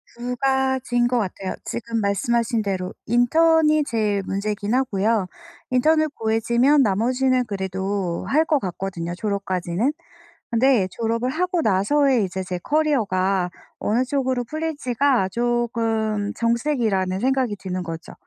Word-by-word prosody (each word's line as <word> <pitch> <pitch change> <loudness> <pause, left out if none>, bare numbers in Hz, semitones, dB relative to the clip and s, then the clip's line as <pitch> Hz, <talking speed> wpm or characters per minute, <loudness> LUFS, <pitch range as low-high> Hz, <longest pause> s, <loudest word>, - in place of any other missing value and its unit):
2 245 +1 -4
가지인 265 -2 +1
것 245 0 +1
같아요. 190 -2 -3
지금 230 -1 -3
말씀하신 230 +3 0
대로 190 -3 -3
인턴이 310 +6 +4
제일 210 -5 0
문제이긴 205 +2 -2
하고요. 220 -5 +1 0.4
인턴을 310 +5 +3
구해지면 235 +6 +2
나머지는 250 +5 +1
그래도 190 -3 -3
할 310 +4 +3
것 305 -2 +2
같거든요 180 -3 -4
졸업까지는. 195 +2 -1 0.6
근데 235 -3 +3
졸업을 230 +4 -1
하고 360 +4 0
나서의 235 +5 +2
이제 190 0 -4
제 180 -1 -4
커리어가 195 - +1 0.3
어느 235 +5 +1
쪽으로 260 -2 -1
풀릴지가 280 -6 0
쪼금 225 -2 -1
정색이라는 230 -6 0
생각이 255 -3 +1
드는 185 -1 -4
거죠. 165 -1 -7
230 Hz, 300 characters per minute, -22 LUFS, 195-260 Hz, 0.6 s, 인턴이